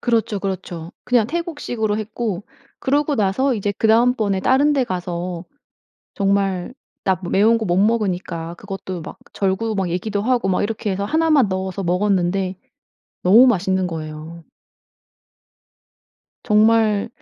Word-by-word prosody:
그렇죠, 225 -3 0
그렇죠. 180 -3 -5
그냥 240 -4 +3
태국식으로 290 -9 -2
했고 215 -2 -4 0.4
그러고 290 +2 +1
나서 245 +4 +1
이제 205 -1 -1
그다음번에 220 -2 +2
다른 280 +7 +3
데 270 -3 +2
가서 180 -3 -4 0.9
정말 195 +1 -1 0.3
나 190 - +2
므 175 - -5
매운 220 +4 +4
거 225 - -3
못 175 -2 +1
먹으니까 185 -6 0
그것도 195 -3 -6
막 - - -9 0.2
절구 200 +3 -1
막 190 -3 -1
얘기도 200 +4 -2
하고 240 -2 +1
막 185 - +1
이렇게 210 -1 -2
해서 195 +1 -2
1 320 +7 +1
만 275 -8 +5
넣어서 190 +1 -3
먹었는데 185 0 0 0.7
너무 215 +8 +7
맛있는 190 -4 +1
거예요. 160 0 -7 2.0
정말, 215 -1 +3
200 Hz, 280 characters per minute, -20 LUFS, 185-230 Hz, 2.0 s, 너무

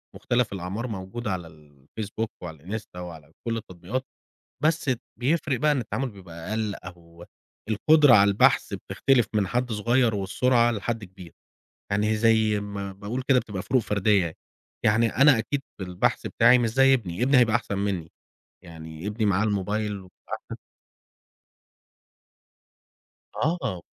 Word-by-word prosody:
مختلف 120 -3 0
الأعمار 95 +6 -4
موجودة 105 +2 -5
على 90 -3 -4
الFacebook 80 +9 -7 0.2
وعلى 85 +5 -6
الInsta 90 -4 -13
وعلى 80 -4 -9 0.2
كل 115 - 0
التطبيقات، 105 +4 -5 0.6
بس 160 0 +2
ت 130 -4 0 0.2
بيفرق 140 0 0
بقى 150 0 +3
إن 145 - 0
التعامل 120 +3 -3
بيبقى 90 -3 -10
أقل، 110 -2 -1
أو 85 -1 -12 0.4
القدرة 145 +5 +5
على 100 -2 +6
البحث 100 - +3
بتختلف 130 -4 +1
من 105 -3 +2
حد 125 +2 -1
صغير 120 +2 +2
والسرعة 120 +5 +2
لحد 115 0 -3
كبير. 90 -2 -13 0.6
يعني 105 +2 +1
زي 110 -1 +3
ما 100 -1 -5
باقول 105 +7 -5
كده 135 -2 +5
بتبقى 100 -5 -4
فروق 125 +5 +1
فردية 105 -2 +2
يعني، 80 - -5 0.5
يعني 110 +2 +4
أنا 135 -1 +6
أكيد 135 +5 -2 0.2
في 95 - -4
البحث 90 -1 -1
بتاعي 125 0 +5
مش 120 - +1
زي 135 +3 +5
ابني، 100 -4 -3
ابني 135 +1 +4
هيبقى 120 -3 +4
أحسن 100 -4 -4
منِّي، 95 -5 -2 0.5
يعني 80 0 -9
ابني 105 +1 -1
معاه 100 0 +2
الموبيل 105 +1 -1
وبيبقى 95 -3 -10
أحسن. - - -10 2.8
آه. 145 - -1
105 Hz, 145 wpm, -25 LUFS, 95-120 Hz, 2.8 s, على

